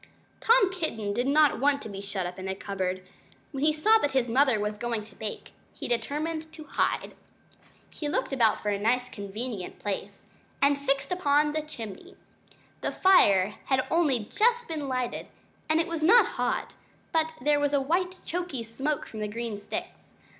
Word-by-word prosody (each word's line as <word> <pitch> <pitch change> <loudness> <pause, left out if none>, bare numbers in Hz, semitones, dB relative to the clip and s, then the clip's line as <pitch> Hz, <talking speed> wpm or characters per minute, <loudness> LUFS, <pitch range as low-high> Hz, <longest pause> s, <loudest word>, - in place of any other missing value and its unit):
Tom 455 -5 +4
Kitten 225 - -2
did 245 +5 0
not 300 +1 +4
want 280 +1 +3
to - - -5
be 200 -2 -7
shut 195 -2 -3
up 180 +1 -6
in 185 - -5
a 190 - -2
cupboard. 185 -2 -3 0.5
When 275 -2 -3
he 310 - +5
saw 430 +9 +4
that 290 - 0
his 250 -3 +1
mother 260 -2 +4
was 210 0 -2
going 235 -2 -2
to 210 -1 -16
bake, 215 +1 -6 0.2
he - - -6
determined 310 +6 -2
to 315 -1 -9
hide. - - -1 0.8
He 295 - -4
looked 290 - -1
about 230 -5 +3
for 210 - 0
a 200 -1 0
nice 245 +4 +1
convenient 205 0 -5
place, 200 0 -5 0.3
and 280 +1 +4
he 280 0 -12
fixed 275 +4 +1
upon 295 -4 +2
the 310 - 0
chimney. 225 -10 -9 0.7
The - - -1
fire 205 - +4
had 260 -1 +1
only 285 -10 +2
just 475 - +2
been 310 -4 -4
lighted, 255 -2 -2 0.4
and 315 +1 +3
it 330 - +2
was 335 -2 -3
not 420 +10 +6
hot; - - -1 0.4
but 320 0 +1
there 290 +3 +2
was 290 -1 +1
a 285 - +3
white 360 +6 -1
choky 345 -8 -3
smoke 270 +7 -2
from 220 - -9
the 210 - -2
green 225 -1 -4
sticks. 345 - -7
270 Hz, 185 wpm, -28 LUFS, 215-310 Hz, 0.8 s, not